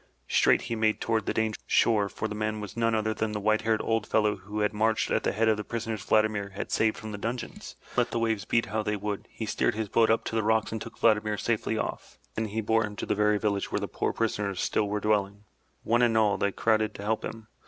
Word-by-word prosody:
Straight - - +4
he 115 - -3
made 110 -1 +1
toward 110 -2 -1
the - - +1
dangerous 110 -1 -1
shore, 105 -3 +3
for 110 - -3
the 105 - -5
man 110 0 -2
was 105 0 -7
none 115 -1 +1
other 110 0 0
than 110 0 -2
the 105 - -2
white 110 +1 +2
haired 110 0 +1
old 115 -1 0
fellow 105 -1 +2
who 105 +3 -5
had 105 +1 +1
marched 110 +1 +1
at - - +2
the - - 0
head 115 +2 +1
of 110 -1 +3
the 105 - -3
prisoners 115 -2 -4
Vladimir 110 -2 +2
had - - -5
saved 110 -1 +2
from 110 -1 -7
the 105 - -6
dungeons. 120 +3 -5 0.2
And - - -15
let 120 - +2
the - - -2
waves 110 -3 0
beat 115 +5 +1
how 110 +2 -2
they 105 0 -1
would, 105 0 -4
he 110 - -6
steered 105 - 0
his 110 -2 -3
boat 115 +2 +3
up 115 - +3
to - - -4
the 110 - +2
rocks 110 0 +1
and 110 -1 -4
took 115 - -8
Vladimir 105 -1 +2
safely 110 0 -1
off. - - -5 0.2
Then 110 - -2
he 110 +1 -2
bore 110 +1 +2
him 105 -1 -5
to - - -4
the - - 0
very 105 0 +2
village 100 -1 -1
where - - 0
the - - -3
poor - - -1
prisoners 105 -4 -1
still 105 - +1
were 105 +1 -1
dwelling. 105 -1 0 0.4
One 120 +2 +2
and 115 -2 +3
all, 105 -2 +3
they 100 - +1
crowded 110 0 +1
to 100 - -7
help 110 +1 -1
him. 115 -1 -6
110 Hz, 265 wpm, -28 LUFS, 105-110 Hz, 0.4 s, Straight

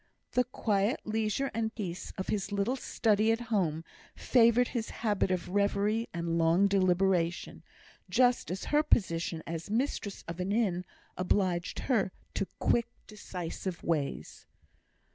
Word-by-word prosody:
The 250 0 +2
quiet 210 -2 0
leisure 220 +5 -1
and 220 0 -2
peace 185 -5 -5
of 190 - -4
his 200 -1 -1
little 200 +5 0
study 220 -4 +2
at 225 - +1
home 165 -6 +1 0.3
favoured 240 0 +4
his 230 -3 -3
habit 210 -4 0
of 185 -1 -1
reverie 205 +3 +1
and 170 0 -1
long 165 +4 +4
deliberation, 185 -2 +1 0.5
just 245 -1 +3
as 185 +2 -4
her 300 - +6
position 170 - +1
as 165 +2 -5
mistress 220 -3 -2
of 165 +1 -6
an 185 +2 -1
inn 195 -5 +1 0.3
obliged 185 -1 0
her 215 -8 +2 0.2
to 195 - -1
quick, 235 -1 +2 0.2
decisive 185 -3 -6
ways. 145 - -2
200 Hz, 135 wpm, -30 LUFS, 175-225 Hz, 0.5 s, her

